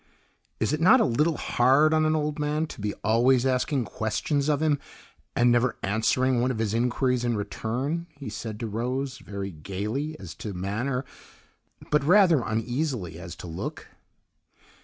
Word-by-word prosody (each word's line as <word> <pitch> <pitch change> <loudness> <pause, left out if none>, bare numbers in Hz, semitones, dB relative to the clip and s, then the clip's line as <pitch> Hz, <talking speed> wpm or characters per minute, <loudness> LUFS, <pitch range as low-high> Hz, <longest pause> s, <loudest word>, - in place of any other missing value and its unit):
"Is 110 +6 0
it 155 - -1
not 220 +10 +7
a - - +4
little 150 +7 +1
hard 135 +6 +3
on 155 0 +3
an 155 - +2
old 150 0 -1
man 150 +1 0
to 150 - -10
be 105 0 -2
always 120 +4 +3
asking 130 0 +1
questions 135 +8 -1
of 145 -2 +2
him, 150 -2 +2 0.6
and 120 0 +4
never 120 +1 +2
answering 120 +5 +2
one 125 - +1
of 125 - -2
his 110 -2 -1
inquiries 125 +1 +1
in 120 -2 0
return?" 130 +11 -3
he 140 -2 -9
said 105 +1 -6
to 115 - -2
Rose, 125 +5 -3
very 100 -1 -6
gayly 105 - -4
as 90 -4 -8
to 105 -4 -6
manner, 120 +8 -2 0.9
but 150 -1 +3
rather 175 -3 +5
uneasily 115 - -2
as 85 -1 -8
to - - -10
look. 80 -1 -6
125 Hz, 165 wpm, -26 LUFS, 110-150 Hz, 0.9 s, not